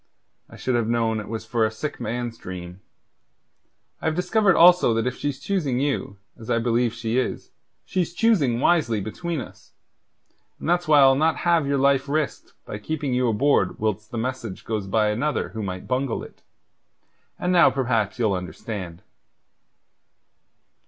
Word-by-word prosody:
I - - -13
should 130 - -2
have 120 -2 +1
known 115 -1 +1
it 110 +2 -5
for 115 -2 0
a 110 - +3
sick 145 +8 -5
man's 120 +1 -3
dream. 90 -2 -8 1.2
I - - -7
have 160 0 +1
discovered 190 +2 +2
also 175 -9 +6
that 115 - 0
if 125 0 -1
she's 145 -2 -3
choosing 150 -11 -1
you, 135 -7 -2 0.2
as 110 - -10
I - - +2
believe 120 0 +1
she 115 +1 -1
is, 130 - -4 0.3
she's 180 -3 -1
choosing 165 - +2
wisely 135 -8 +2
between 160 - -4
us, 125 - -11 0.9
and - - -6
that's 175 0 +1
why 150 -2 +6
I'll 135 0 +7
not 155 +4 +2
have 170 -4 +3
your 140 0 +1
life 140 0 +2
risked 150 0 -2
by 105 - -6
keeping 145 +3 -3
you 125 0 +2
aboard 115 -4 +2
whilst 110 0 -2
the 120 - -6
message 120 -4 -4
goes 105 -3 -3
by 105 +2 +2
another 145 +8 -1
who 110 - -6
might 95 -2 -5
bungle 130 -1 -1
it. - - -13 1.0
And 180 +1 0
now 175 -1 +7
perhaps 120 -6 0
ye'll 110 -5 +1
understand." 90 -1 -6
125 Hz, 165 wpm, -24 LUFS, 110-150 Hz, 1.2 s, I'll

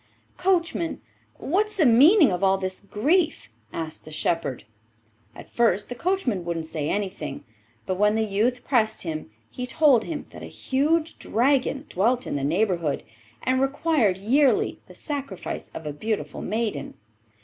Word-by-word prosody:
'Coachman, 340 -3 0 0.4
what's 420 +7 0
the 345 -6 +3
meaning 280 - +7
of 180 +2 -2
all 195 0 +4
this 185 -1 -4
grief?' 300 - 0 0.2
asked 160 +3 -5
the - - -11
shepherd. 155 -5 -2 0.7
At - - -11
first 225 -4 +1
the - - -3
coachman 255 - -1
wouldn't 170 -1 -3
say 155 -2 -3
anything, 185 -8 -3 0.4
but 185 0 -2
when 210 +1 +4
the 220 0 +1
youth 225 +5 0
pressed 220 -5 +1
him 155 -8 -5 0.2
he 250 - -5
told 270 -5 +4
him 315 -3 -5
that - - -11
a - - -7
huge 310 +4 0
dragon 270 +4 +1
dwelt 240 +7 +1
in - - -3
the 140 - -2
neighbourhood, 170 -1 0 0.4
and 260 +1 +1
required 270 - +2
yearly 260 +8 +2
the - - -14
sacrifice 275 - -5
of 160 - -7
a 150 - -3
beautiful 215 +8 -3
maiden. 220 +1 -3
225 Hz, 150 wpm, -25 LUFS, 185-285 Hz, 0.7 s, meaning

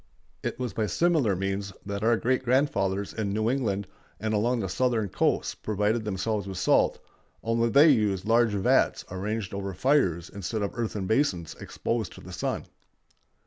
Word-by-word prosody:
It - - -3
was 125 -5 -3
by 110 +1 0
similar 145 - +2
means 95 +1 -2
that 100 0 -4
our 115 +1 +4
great 130 +3 0
grandfathers 100 -7 +1
in 105 -3 -2
New 110 +3 +1
England 105 -7 -1 0.3
and 110 0 -1
along 120 +4 +1
the 95 - -2
Southern 110 +2 0
coasts - - 0
provided 105 +2 -1
themselves 105 0 -2
with 95 -2 -5
salt, 95 - +3 0.5
only 115 +1 +1
they 145 +7 +7
used 105 -8 +2
large 115 +1 +4
vats 100 -2 +2
arranged 100 +1 -3
over 100 -1 -4
fires 95 - +2
instead 100 +2 -4
of 100 - -2
earthen 110 -4 -3
basins 95 - 0
exposed 115 -5 -3
to - - -12
the - - -10
sun. - - -2
105 Hz, 165 wpm, -27 LUFS, 95-120 Hz, 0.5 s, they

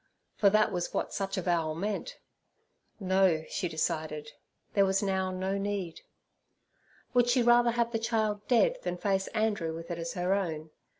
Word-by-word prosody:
for 200 - +4
that 215 +1 +3
was 175 -2 -3
what - - -2
such 195 0 -2
avowal 170 -4 0
meant. 210 - -3 0.8
No, 190 -4 +2
she 180 - -2
decided; 155 -1 -2 0.4
there 200 - +4
was 195 +1 +1
now 190 -1 0
no 190 +1 -2
need. 195 -4 -3 1.1
Would 245 -1 +4
she 245 0 +3
rather 240 0 +5
have 235 0 0
the 225 - -1
child 215 -2 -1
dead 485 - +3
than 180 - -3
face 195 0 0
Andrew 210 -7 -1
with 165 +1 -7
it 170 - -4
as 165 0 -4
her 180 +1 0
own? 160 -5 -2
195 Hz, 165 wpm, -30 LUFS, 175-215 Hz, 1.1 s, rather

